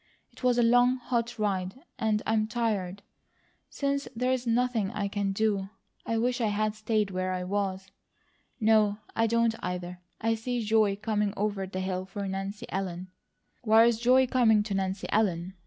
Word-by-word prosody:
It - - -17
was 250 -1 +3
a 240 - +4
long, 245 +2 +4
hot 240 -1 -2
ride, 190 -3 -1 0.2
and 215 -1 +1
I'm 220 -1 +1
tired. 210 -5 -2 0.7
Since 280 0 -2
there's 250 +1 0
nothing 230 -3 +1
I 200 0 -2
can 200 -1 -1
do, 200 -1 0 0.4
I 230 - 0
wish 245 +2 0
I 225 - +2
had 210 +1 0
stayed 215 -1 -1
where 185 0 -2
I 180 0 -3
was. 190 0 -3 0.7
No, 215 -2 +3 0.2
I 225 0 +2
don't, 230 0 +2
either! 180 0 -5 0.2
I 225 +1 +1
see 235 +1 -3
joy 215 -2 +3
coming 210 -1 -1
over 205 -2 -1
the 185 0 -4
hill 185 0 -2
for 200 0 -5
Nancy 195 +2 -4
Ellen." 185 -1 -4 0.5
"Why 225 0 +6
is 235 -2 +2
joy 255 +2 +5
coming 225 -4 +3
to 205 -1 -4
Nancy 190 0 -2
Ellen?" 185 -4 0
215 Hz, 170 wpm, -28 LUFS, 195-230 Hz, 0.7 s, Why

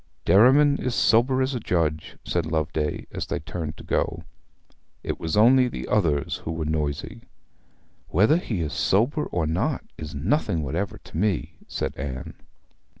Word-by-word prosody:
'Derriman 140 +7 +6
is 125 -1 -2
sober 120 +6 +3
as 130 +1 -1
a 125 - -2
judge,' 80 -7 -1
said 85 -2 -1
Loveday, 80 -1 -1
as - - -4
they - - -2
turned 80 0 -5
to - - -11
go. - - -1 0.8
'It - - -3
was 80 +4 -2
only 125 +4 +6
the 120 - -6
others 75 -9 +1
who - - -6
were 80 -1 -3
noisy.' 75 -2 -2 0.9
'Whether 110 - +4
he 110 - -3
is 75 -2 -3
sober 125 +10 +1
or 85 -3 -1
not 80 +3 -1 0.2
is 75 -2 -6
nothing 90 - 0
whatever 85 +8 -3
to - - -10
me,' 85 -5 0
said - - -3
Anne. 65 -1 -5
85 Hz, 155 wpm, -25 LUFS, 75-120 Hz, 0.9 s, Derriman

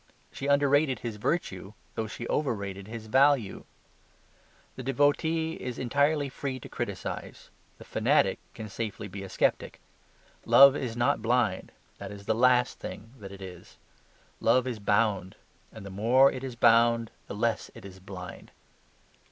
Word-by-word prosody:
She 140 - -5
underrated 140 -2 +3
his 115 -3 -4
virtue, 105 - -2 0.2
though 110 - -3
she 120 +2 -7
overrated 100 -8 -2
his 110 0 -7
value. 130 -2 +2 1.1
The - - -7
devotee 145 +5 +1
is 125 -2 -5
entirely 145 +3 +1
free 130 0 -5
to - - -9
criticise; - - -6 0.3
the - - -12
fanatic - - +2 0.2
can 110 - -7
safely 105 -1 -5
be 100 0 -8
a 95 - -7
sceptic. - - 0 0.6
Love 140 0 +8
is 120 -4 -4
not 120 -2 +1
blind; 120 0 0 0.3
that 100 0 -7
is 100 -1 -10
the 110 - +1
last 125 +1 +3
thing 115 +3 -8
that 100 -2 -9
it 100 0 -10
is. 90 -2 -11 0.6
Love 125 +2 +3
is 120 -4 -4
bound; 100 -3 +1 0.4
and 110 -2 -11
the 100 - -8
more 120 +8 +4
it 130 - -7
is 130 -3 -5
bound 115 -1 +4 0.2
the - - -6
less 115 +2 -1
it - - -12
is 95 -1 -11
blind. 95 -1 -9
115 Hz, 150 wpm, -28 LUFS, 100-135 Hz, 1.1 s, Love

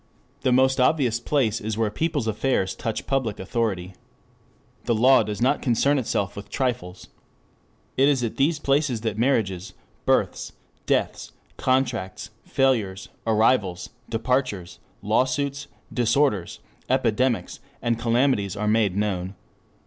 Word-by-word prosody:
The 130 - +2
most 130 +1 +3
obvious 125 -3 +2
place 120 -4 0
is 110 0 -3
where 110 -2 0
people's 155 0 -1
affairs 110 -3 0
touch 115 -3 -4
public 130 -6 -1
authority. 95 -3 -2 0.9
De 115 - +1
minimis 110 -3 +4
non 135 +4 +3
curat 125 -2 0
lex. 90 +1 -11 0.9
It 135 +2 +5
is 135 -4 +1
at 115 - -3
these 150 +4 +2
places 140 -5 +1
that 110 -2 -3
marriages, 105 -8 0 0.3
births, - - +1 0.3
deaths, - - -1 0.2
contracts, 125 -7 -1
failures, 110 -8 0 0.2
arrivals, 110 -4 +2 0.2
departures, 115 -5 -1 0.2
lawsuits, 135 +6 0 0.3
disorders, 120 -5 +1 0.3
epidemics 115 -4 +1 0.2
and 115 -1 -1
calamities 120 -5 +1
are 105 +1 -2
made 105 -3 +2
known. 95 -2 -2
115 Hz, 110 wpm, -24 LUFS, 105-130 Hz, 0.9 s, It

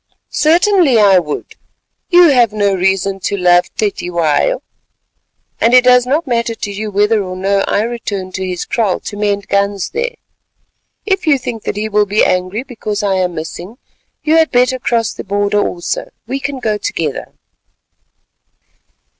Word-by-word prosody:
"Certainly, 340 - +3
I 200 -3 +5
would. 150 -4 -5 0.6
You 350 -2 +6
have 245 -5 +4
no 205 -2 +1
reason 195 +1 0
to 200 +2 -2
love 180 -1 +3
Cetywayo, 180 - 0 1.0
and 235 +2 +4
it 250 - +7
does 250 0 +4
not 300 +5 0
matter 235 -3 -1
to 205 - -5
you 210 +2 -4
whether 210 +2 +2
or 185 -1 -5
no 195 +2 0
I 205 - +1
return 205 -5 -4
to 190 +1 -4
his 180 -2 -4
kraal 215 -6 0
to - - -7
mend 205 -1 -1
guns 200 -1 -1
there. 475 +2 -3 0.9
If 385 -4 -1
you 290 -3 +5
think 240 -4 -6
that - - -2
he 215 +1 -2
will 210 -1 +1
be 205 +2 +2
angry 185 +6 -1
because 215 -5 -5
I 200 -1 +1
am 180 -2 -1
missing, 175 +7 -7 0.5
you 315 +1 +3
had 320 -1 +4
better 250 +1 +2
cross 230 -2 0
the - - -8
border 205 +1 0
also; 175 -3 -3 0.2
we 265 +4 -3
can 275 0 -4
go 215 -4 -2
together." 155 -8 -4
210 Hz, 165 wpm, -15 LUFS, 195-250 Hz, 1.0 s, it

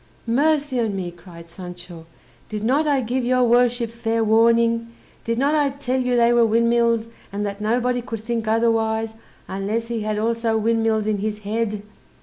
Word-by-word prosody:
"Mercy 285 +2 +1
o' 225 -2 +1
me!" 190 -3 -4
cried 170 -1 -14
Sancho, 175 -2 -10 0.4
"did 210 -1 -4
not 280 +7 +2
I 280 -3 +2
give 250 +2 -2
your 255 +1 +2
worship 240 -1 +2
fair 230 -1 -1
warning? 230 +1 +3 0.4
Did 230 0 -2
not 280 +4 +2
I 295 -2 +2
tell 265 -2 -2
you 250 -1 0
they 235 0 +4
were 240 0 +5
windmills, 230 0 +2 0.2
and 205 +1 -3
that 200 0 -5
nobody 245 +3 0
could 225 -2 -6
think 225 0 -3
otherwise, 225 0 +1 0.3
unless 210 +4 -3
he 230 -2 -2
had 215 0 -2
also 230 +1 0
windmills 225 -1 +1
in 210 -1 0
his 210 +1 -3
head!" 215 -1 -2
230 Hz, 170 wpm, -22 LUFS, 215-240 Hz, 0.4 s, were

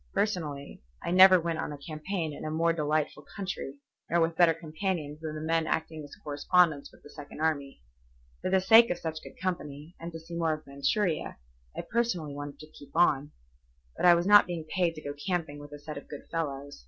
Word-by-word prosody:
Personally, 155 -9 -2 0.2
I - - -2
never 185 0 +8
went 165 -1 -2
on - - -3
a 145 - -6
campaign 155 +2 -4
in - - -8
a 155 - -3
more 165 +2 +2
delightful 150 -1 -1
country 190 -8 -4 0.3
nor 170 - +2
with 165 0 +1
better 165 -1 +5
companions 160 -2 -4
than 155 -1 -5
the 155 - -5
men 165 0 0
acting 160 -1 -2
as 145 - -11
correspondents 150 +1 +2
with - - -21
the - - -13
Second 145 0 -10
Army. 140 - -1 0.6
For - - -1
the 190 0 +3
sake 225 +4 +7
of 175 - -1
such 160 -2 -5
good - - -13
company, 165 -3 -4
and 170 +1 -6
to 165 - -7
see 165 +1 -12
more 165 -2 +1
of 155 0 -7
Manchuria, 155 +5 -1 0.4
I - - -1
personally 185 -11 -1
wanted 145 0 -7
to 155 0 -13
keep 145 - -15
on. 145 -4 +3 0.7
But - - +2
I 175 - +9
was 170 +1 0
not 205 0 +7
being 170 -3 -4
paid 175 -3 +1
to 155 - -9
go 145 - -4
camping 160 -1 -3
with 145 0 -11
a 145 - -8
set 150 0 -7
of - - -19
good 145 - -8
fellows. 145 -4 -4
160 Hz, 215 wpm, -29 LUFS, 145-175 Hz, 0.7 s, I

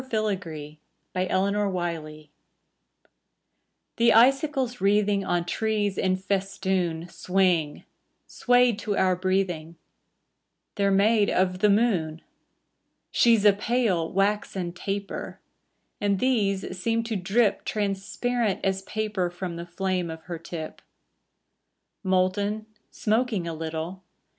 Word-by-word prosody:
SILVBR 190 - -3 0.4
FILAGREE 180 -5 -1 1.7
The 230 0 +5
icicles 260 +1 +3
wreathing 200 0 +2
On 175 -2 0
trees 210 +1 -1
in 185 -1 +1
festoon 190 -3 -1
Swing, 180 -4 0 0.4
swayed 245 -3 +3
to 205 -1 -2
our 185 -1 +3
breathing: 180 -3 -1 1.0
They're 200 -1 +1
made 205 +2 +3
of 185 0 +1
the 210 +1 +4
moon. 200 -7 +2
• - - -23 0.9
She's 230 -3 +4
a 205 - +8
pale, 205 -6 0
waxen 195 -2 0
taper; 195 +2 -5 0.6
And 200 -1 +1
these 200 -6 0
seem 230 +2 +1
to 225 -1 -3
drip 200 +4 +1
Transparent 210 +2 -1
as 190 0 0
paper 210 -3 -2
From 175 0 -5
the 170 +1 -7
flame 180 0 -2
of 160 0 -8
her 170 -2 -6
tip. 160 -1 -7 1.2
Molten, 195 +3 0 0.2
smoking 215 -4 0
a 165 - -3
little. 160 +3 -5
195 Hz, 105 wpm, -26 LUFS, 180-215 Hz, 1.7 s, a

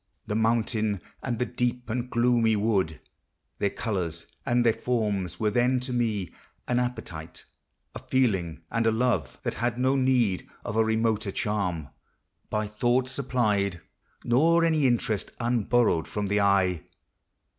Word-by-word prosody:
The 105 - -3
mountain, 110 -2 +1 0.2
and 120 -3 -2
the 125 - 0
deep 125 0 -2
and 120 +2 -3
gloomy 120 -2 +3
wood, 100 -7 0 0.6
Their 100 - +2
colors 90 -7 -3 0.2
and 120 0 +2
their 115 - +5
forms, 105 -8 -1
were 105 -1 +1
then 125 +3 +2
to 125 0 -3
me 110 -7 -1 0.3
An 125 0 +2
appetite; 110 -10 -5 0.5
a - - -6
feeling 95 -11 0
and 115 -1 +1
a - - +5
love, 110 - 0
That - - -1
had 120 0 0
no 130 +2 +2
need 125 -8 +1 0.2
of 105 - -3
a 110 - +4
remoter 110 -1 +1
charm 95 -7 -2 0.6
By 105 0 -1
thought 120 +4 +1
supplied, 105 -8 0 0.4
nor 165 +8 +4
any 155 -4 +3
interest 110 -4 0
Unborrowed 120 -6 +2
from 105 -1 -3
the 100 +1 +1
eye. 95 -4 +3
110 Hz, 145 wpm, -27 LUFS, 100-125 Hz, 0.6 s, their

